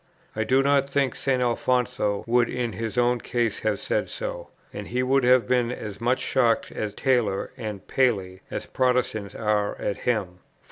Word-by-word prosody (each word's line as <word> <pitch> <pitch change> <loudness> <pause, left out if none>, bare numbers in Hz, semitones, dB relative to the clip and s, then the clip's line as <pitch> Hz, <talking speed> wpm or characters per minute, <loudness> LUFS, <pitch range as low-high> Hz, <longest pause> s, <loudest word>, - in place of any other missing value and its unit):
I 110 - 0
do 130 +4 +3
not 140 0 +3
think 140 -2 +1
St. 130 -2 0
Alfonso 125 -3 0
would 120 0 +3
in 120 -3 -2
his 115 +4 -4
own 120 -1 +2
case 120 -3 -1
have 110 -2 0
said - - -1
so; - - -5 0.2
and - - -6
he 125 +1 -1
would 135 +1 +2
have 125 -3 +4
been 125 -1 +2
as 105 -4 -7
much 125 +2 +2
shocked 120 -4 +1
at 105 -2 -4
Taylor 120 -7 +1
and 105 -3 -6
Paley, 100 -8 0
as - - -4
Protestants 125 -5 0
are 105 -2 0
at 100 - -2
him. 100 -8 -1
120 Hz, 175 wpm, -25 LUFS, 105-130 Hz, 0.2 s, have